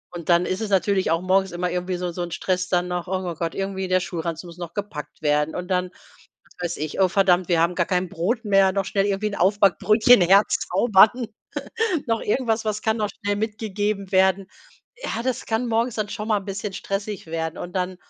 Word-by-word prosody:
und 170 0 -7
dann 175 +1 +4
ist 185 +3 -2
es 220 - -3
natürlich 190 -1 +2
auch 165 +1 +1
morgens 190 0 +2
immer 180 +1 -2
irgendwie 180 0 -2
so 180 0 -3
so 175 - -5
'n 175 -1 -4
Stress 185 +1 -1
dann 180 -1 +1
noch: 180 0 -3
„Oh 185 -2 -2
Gott, 165 +1 -3
irgendwie 195 -1 -3
der 185 - +3
Schulranzen 170 -1 -4
muss 170 0 -12
noch 170 -1 -7
gepackt 200 -9 -6
werden.“ 150 +1 +1
Und 180 +1 -5
dann, 180 -1 0 0.6
was 175 -1 -5
weiß - - -8
ich: 155 +4 -4
„Oh 190 - +6
verdammt, 185 -1 +3
wir 170 -2 +3
haben 170 +1 +1
gar 175 - +1
kein 180 -1 0
Brot 215 +9 -2
mehr, 195 -2 +4
noch 195 0 0
schnell 195 +1 0
irgendwie 200 +1 -1
Aufbackbrötchen 205 +4 +4
herzaubern.“ 205 +4 +4 0.8
Noch 225 -1 0
irgendwas, 225 0 0
was 215 0 -2
kann 220 0 0
noch 210 - 0
schnell 205 0 0
mitgegeben 210 -2 -3
werden? 190 0 +3 0.6
Ja, 230 - -3
das 255 0 -2
kann 230 +2 -1
morgens 230 +1 0
dann 210 -1 -2
schon 215 0 -5
mal 210 -2 +2
bisschen 200 0 -5
stressig 200 -1 -4
werden. 160 0 -3
Und 175 - -7
dann 185 0 -2
190 Hz, 205 wpm, -23 LUFS, 180-210 Hz, 0.8 s, Oh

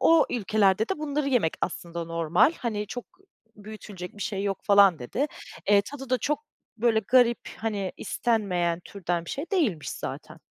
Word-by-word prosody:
o 330 -1 +5
ülkelerde 215 -1 +2
de - - -2
bunları 295 -1 -1
yemek 240 -12 +2
aslında 170 -1 -3
normal, 165 - +3
hani, 210 -4 -2
çok 245 +3 -6 0.5
büyütülecek 205 -3 -9
bir 205 - -5
şey 195 -3 -2
yok 200 -1 -1
falan, 200 -5 +6
dedi. 245 - -2 0.4
Eee, 200 -1 +6
tadı 270 +2 -9
da 255 - +3
çok 300 +5 -1 0.3
böyle 230 -1 +3
garip, 240 +2 +4 0.2
hani, 205 -4 -2
istenmeyen 180 -7 0
türden 175 -3 -3
bir - - -7
şey 285 +5 -4
değilmiş 230 - +1
zaten. - - -6
210 Hz, 160 wpm, -27 LUFS, 180-245 Hz, 0.5 s, falan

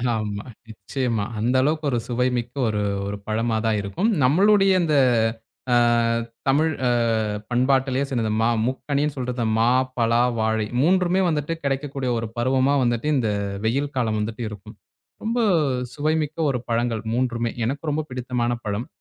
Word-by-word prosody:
ஆமா 105 -2 -3 0.3
நிச்சயமா. 110 +1 -2 0.2
அந்த 120 +4 +1
அளவுக்கு 155 +2 0
ஒரு 120 - +1
சுவைமிக்க 125 -1 -1 0.2
ஒரு 105 -1 -1 0.3
ஒரு 100 0 -4
பழமாதான் 110 0 0
இருக்கும். 165 - -1
நம்மளுடைய 195 +8 +4
இந்த, 155 -3 +1 0.8
அ - - +5 0.7
தமிழ் 155 +4 +3 0.2
அ - - +3 0.6
பண்பாட்டுலயே 130 +2 +2
சொன்னது, 115 -5 -1
மா 115 - +3 0.2
முக்கனின்னு 140 +3 -1
சொல்றது 125 -2 -2
மா, 115 +1 +4 0.3
பலா, 115 0 +3 0.2
வாழை 110 -1 0
3மே 185 +2 +3
வந்துட்டு 155 +1 -1
கிடைக்கக்கூடிய 135 -2 -2
ஒரு 115 -1 -3
பருவமா 130 +3 +2
வந்துட்டு 120 +4 0
இந்த 110 -4 0 0.3
வெயில் 140 +5 0
காலம் 110 -3 0
வந்துட்டு 110 +2 -3
இருக்கும். 105 -2 -11 0.5
ரொம்ப 230 +2 -1 0.5
சுவைமிக்க 155 +1 -1
ஒரு 125 - -1
பழங்கள் 115 -1 0
3மே 120 -1 0
எனக்கு 140 +5 -3
ரொம்ப 150 +2 0
பிடித்தமான 125 -1 -2
பழம். 105 +6 -3
125 Hz, 135 wpm, -23 LUFS, 115-145 Hz, 0.8 s, அ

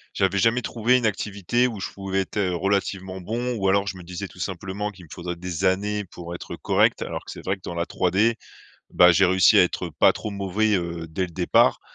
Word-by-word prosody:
j'avais 95 0 +1
jamais 115 +3 +2
trouvé 120 +2 +2
une 120 - -1
activité 105 +3 0
où 110 -5 -6
je - - -5
pouvais 95 -1 -2
êtes, 95 - -7
heu, 90 -3 +1
relativement 95 0 -2
bon, 120 +6 -2
ou 95 -1 0
alors, 100 +1 +3
je 95 - -4
me - - -10
disais 90 +3 -6
tout 90 - -17
simplement 95 +3 -4
qu'il 90 -4 -14
me - - -21
faudrait 90 0 -5
des 85 -1 -4
années 105 +2 +1
pour 85 -1 -9
être 85 - -7
correct. - - +2
Alors - - -5
que - - -13
c'est - - -10
vrai 95 +1 0
que - - -28
dans 85 - -6
la 85 0 -1
3D, 100 +6 +1 0.6
bah, 90 0 +6
j'ai 95 +3 +4
réussi 95 0 +5
à - - +7
être - - -3
pas - - +6
trop 105 - -6
mauvais, 100 +2 0
heu, 85 -2 -4
dès 85 +4 -3
le 90 -2 -3
départ, 90 +1 +3
95 Hz, 235 wpm, -24 LUFS, 90-105 Hz, 0.6 s, à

